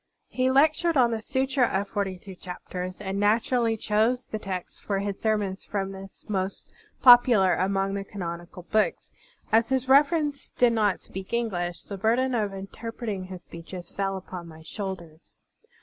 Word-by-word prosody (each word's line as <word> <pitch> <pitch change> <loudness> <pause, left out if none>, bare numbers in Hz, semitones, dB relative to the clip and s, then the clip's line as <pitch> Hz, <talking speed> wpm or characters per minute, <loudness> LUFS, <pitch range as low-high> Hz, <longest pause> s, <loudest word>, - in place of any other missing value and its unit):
He 255 0 +1
lectured 310 +4 +3
on 240 -2 +5
the 225 -1 -2
Sutra 265 +1 +1
of 200 0 -1
Forty 195 -2 -2
two 190 +1 -11
Chapters, 180 0 -7
and 195 -1 -3
naturally 225 +2 +2
chose 220 +4 +1
the 215 - -5
texts 185 -3 -5
for 200 - -2
his 200 0 -3
sermons 210 -3 0
from 195 -1 -3
this 195 0 -11
most 195 -2 -3 0.3
popular 240 -7 +8
among 195 +1 0
the 200 0 -2
canonical 175 -2 -7
books. 215 +4 0 0.4
As 225 +1 +4
His 265 -1 0
Reverence 290 +1 +3
did 245 -1 +3
not 210 -4 +1
speak 190 +3 -8
English, 180 -7 -2
the 200 - -7
burden 245 +5 +2
of 210 -4 0
interpreting 200 +1 -5
his 185 -1 -9
speeches 175 +2 -9
fell 195 -1 -2
upon 180 -2 -8
my 160 -1 -12
shotilders. 170 -4 -7
200 Hz, 160 wpm, -26 LUFS, 190-235 Hz, 0.4 s, popular